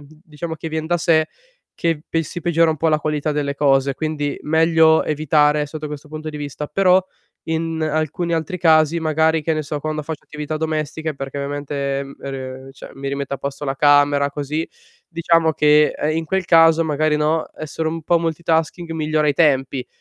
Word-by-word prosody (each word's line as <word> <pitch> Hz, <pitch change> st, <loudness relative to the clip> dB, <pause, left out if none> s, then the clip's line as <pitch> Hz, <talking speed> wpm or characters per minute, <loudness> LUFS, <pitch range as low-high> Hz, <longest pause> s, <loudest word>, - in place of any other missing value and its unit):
mhmm, 145 Hz, -, -15 dB, 0.2 s
diciamo 160 Hz, +1 st, -6 dB
che 160 Hz, +1 st, -6 dB
vien 160 Hz, 0 st, -3 dB
da 175 Hz, +1 st, +1 dB
sé 160 Hz, -2 st, +2 dB, 0.5 s
che 165 Hz, -3 st, -1 dB
pe 165 Hz, -, -1 dB
si 170 Hz, +3 st, -7 dB
peggiora 170 Hz, -1 st, +3 dB
un 160 Hz, -, 0 dB
po' 160 Hz, +2 st, +1 dB
la 155 Hz, -, +3 dB
qualità 150 Hz, 0 st, -1 dB
delle 145 Hz, -1 st, -2 dB
cose. 140 Hz, -1 st, +2 dB
Quindi 150 Hz, -2 st, -3 dB
meglio 160 Hz, 0 st, +4 dB
evitare 150 Hz, 0 st, +2 dB
sotto 155 Hz, +1 st, -6 dB
questo 150 Hz, 0 st, -8 dB
punto 155 Hz, +1 st, -7 dB
di 150 Hz, -, -6 dB
vista, 145 Hz, 0 st, -5 dB
però 185 Hz, +2 st, +3 dB, 0.4 s
in 160 Hz, 0 st, -2 dB
alcuni 155 Hz, +2 st, -1 dB
altri 165 Hz, +3 st, -3 dB
casi 160 Hz, -1 st, +4 dB
magari, 160 Hz, 0 st, +2 dB
che 160 Hz, +1 st, 0 dB
ne 155 Hz, -, -2 dB
so, 150 Hz, 0 st, -4 dB
quando 155 Hz, 0 st, -3 dB
faccio 160 Hz, 0 st, -7 dB
attività 150 Hz, +1 st, -5 dB
domestiche 155 Hz, 0 st, -3 dB
perché 135 Hz, 0 st, -6 dB
ovviamente, 140 Hz, -1 st, -3 dB
ehm, 140 Hz, 0 st, -8 dB
e 140 Hz, -, -5 dB
re 130 Hz, 0 st, -7 dB
cioè -, -, -12 dB
mi 135 Hz, 0 st, -5 dB
rimetto 140 Hz, 0 st, -4 dB
a -, -, -7 dB
posto 140 Hz, +1 st, -5 dB
la 135 Hz, -1 st, -2 dB
camera 145 Hz, 0 st, +4 dB
così, 150 Hz, +3 st, -3 dB, 0.4 s
diciamo 165 Hz, -1 st, +2 dB
che, 150 Hz, 0 st, +4 dB
ehm, 155 Hz, +1 st, -1 dB
in 165 Hz, -, -2 dB
quel 190 Hz, +3 st, -1 dB
caso 165 Hz, -1 st, +5 dB
magari, 155 Hz, 0 st, +1 dB
no, 155 Hz, +1 st, 0 dB
essere 155 Hz, +1 st, -3 dB
un 165 Hz, 0 st, -5 dB
po' 170 Hz, +2 st, +2 dB
multitasking 165 Hz, +1 st, -1 dB
migliora 155 Hz, -1 st, 0 dB
i -, -, +3 dB
tempi 135 Hz, -4 st, +1 dB
155 Hz, 195 wpm, -20 LUFS, 145-160 Hz, 0.5 s, caso